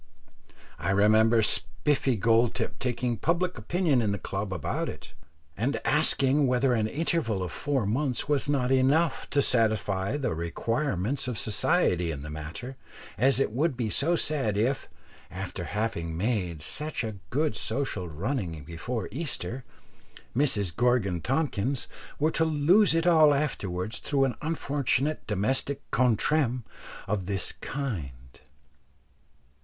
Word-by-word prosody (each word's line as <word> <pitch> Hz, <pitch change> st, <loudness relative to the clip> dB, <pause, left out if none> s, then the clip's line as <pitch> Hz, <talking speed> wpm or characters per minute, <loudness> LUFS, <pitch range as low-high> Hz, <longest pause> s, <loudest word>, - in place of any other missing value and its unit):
I 90 Hz, +4 st, -2 dB
remember 110 Hz, +3 st, +4 dB
Spiffy 135 Hz, +3 st, 0 dB
Goldtip 115 Hz, +3 st, +1 dB
taking 125 Hz, -1 st, -1 dB
public 175 Hz, -, 0 dB
opinion 150 Hz, -, +1 dB
in 105 Hz, -3 st, 0 dB
the 100 Hz, -, -1 dB
club 100 Hz, 0 st, -3 dB
about 90 Hz, -6 st, -2 dB
it, -, -, -10 dB, 0.4 s
and 125 Hz, +8 st, -1 dB
asking 145 Hz, -2 st, +3 dB
whether 125 Hz, +1 st, +2 dB
an 110 Hz, -2 st, +1 dB
interval 140 Hz, -, -1 dB
of 90 Hz, -, -4 dB
four 140 Hz, -2 st, -1 dB
months 125 Hz, +6 st, -1 dB
was 145 Hz, -1 st, +1 dB
not 130 Hz, -3 st, +1 dB
enough 135 Hz, +6 st, +2 dB
to 140 Hz, -, +2 dB
satisfy 110 Hz, -2 st, +1 dB
the 135 Hz, -, -1 dB
requirements 115 Hz, -, -2 dB
of 125 Hz, -3 st, -3 dB
society 105 Hz, -, +2 dB
in 70 Hz, -3 st, -5 dB
the 75 Hz, -, -7 dB
matter, 80 Hz, -, -7 dB, 0.4 s
as 130 Hz, +6 st, +3 dB
it 135 Hz, -, +1 dB
would 140 Hz, +3 st, 0 dB
be 115 Hz, -4 st, -2 dB
so 165 Hz, +10 st, +2 dB
sad 135 Hz, -11 st, +1 dB
if, 120 Hz, +5 st, 0 dB, 0.4 s
after 90 Hz, -1 st, -6 dB
having 100 Hz, -7 st, -3 dB
made 90 Hz, -6 st, -1 dB
such 150 Hz, -, -1 dB, 0.2 s
good 150 Hz, +3 st, 0 dB
social 110 Hz, -7 st, -1 dB
running 85 Hz, -, -3 dB
before 90 Hz, -, -4 dB
Easter, 130 Hz, -, -3 dB, 0.7 s
Mrs 105 Hz, -, +1 dB
Gorgon 110 Hz, -7 st, +1 dB
Tompkins 135 Hz, -, -1 dB, 0.3 s
were 155 Hz, +2 st, +1 dB
to 165 Hz, -, +1 dB
lose 165 Hz, +5 st, +4 dB
it 165 Hz, 0 st, +1 dB
all 155 Hz, -4 st, +6 dB
afterwards 105 Hz, -9 st, -2 dB
through 140 Hz, -2 st, +1 dB
an 130 Hz, -, -2 dB
unfortunate 145 Hz, -2 st, -1 dB
domestic 130 Hz, +7 st, -1 dB
contretemps 125 Hz, +1 st, +2 dB, 0.4 s
of 95 Hz, -2 st, -2 dB
this 100 Hz, -1 st, -2 dB
kind. 120 Hz, -, -4 dB
125 Hz, 130 wpm, -27 LUFS, 100-145 Hz, 0.7 s, all